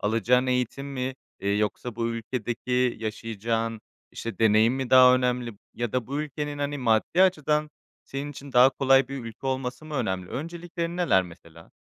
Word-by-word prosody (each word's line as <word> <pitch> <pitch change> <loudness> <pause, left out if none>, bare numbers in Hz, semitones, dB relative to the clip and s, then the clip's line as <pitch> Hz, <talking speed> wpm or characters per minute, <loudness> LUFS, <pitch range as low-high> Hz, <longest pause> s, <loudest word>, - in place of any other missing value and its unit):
alacağın 115 +4 +2
eğitim 125 +2 -1
mi, 130 -1 -3 0.3
eee, 100 - -2
yoksa 105 +2 -2
bu 115 -1 -1
ülkedeki 120 +1 -1
yaşayacağın 115 0 -3 0.3
işte 115 -5 -6
deneyim 110 +2 +4
mi 130 -2 -3
daha 130 -1 +8
önemli 125 -1 0 0.2
ya 120 -2 -3
da 125 -3 -1
bu 140 +3 -2
ülkenin, 145 0 -5
hani, 145 0 -2
maddi 120 +8 +2
açıdan 150 -4 +2 0.3
senin 140 +2 -5
için 140 -1 -10
daha 125 +2 +7
kolay 135 -1 +3
bir 135 -3 -6
ülke 115 +4 -8
olması 130 +1 -3
mı 155 -1 -8
önemli? 95 -8 -2
Önceliklerin 170 +2 -5
neler 170 - +3
mesela? 85 -2 -14
125 Hz, 160 wpm, -26 LUFS, 115-140 Hz, 0.3 s, daha